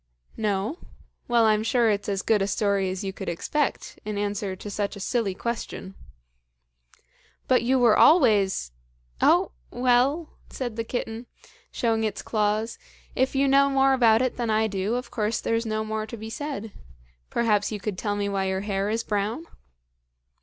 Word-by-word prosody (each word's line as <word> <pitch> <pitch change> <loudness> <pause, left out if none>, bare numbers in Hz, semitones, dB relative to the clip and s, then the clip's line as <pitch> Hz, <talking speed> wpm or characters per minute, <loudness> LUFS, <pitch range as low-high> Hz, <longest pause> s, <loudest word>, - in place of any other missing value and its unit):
"No? 210 - -1 0.5
Well, 235 -2 +4
I'm 215 -1 +3
sure 230 0 +2
it's 205 0 -2
as 195 -1 -1
good 215 -3 +2
a 195 - +1
story 200 -2 +1
as 185 +1 -4
you 195 -1 -3
could 195 - -5
expect 280 - -2
in 210 -1 -4
answer 205 -1 -2
to 205 - -8
such 205 +1 -2
a - - -9
silly 205 -2 -1
question." 220 -3 -5 1.5
"But - - +4
you 260 +3 +2
were 240 -4 +5
always 210 - +4 0.3
" - - -24
"Oh, - - +4 0.2
well!" 255 +6 +2 0.2
said 245 -4 -5
the 230 - -2
kitten, 230 0 -4 0.4
showing 225 -2 0
its 215 - -2
claws, 215 +1 -1 0.4
"if 260 +2 +1
you 275 +1 +3
know 275 +1 +5
more 270 0 +3
about 235 -2 +4
it 255 - -1
than 240 -2 -2
I 220 0 +2
do, 205 +2 -1
of 250 +1 -4
course 220 0 -1
there's 230 0 -1
no 215 0 -1
more 215 0 -3
to 235 - -7
be 220 +1 -7
said. 270 -5 -5 0.6
Perhaps 215 -3 +1
you 210 - -4
could 200 -2 -4
tell 205 -2 -1
me 205 0 -1
why 195 -1 -1
your 190 0 -1
hair 200 0 -1
is 225 +1 -1
brown?" 210 +9 -2
220 Hz, 175 wpm, -25 LUFS, 200-240 Hz, 1.5 s, were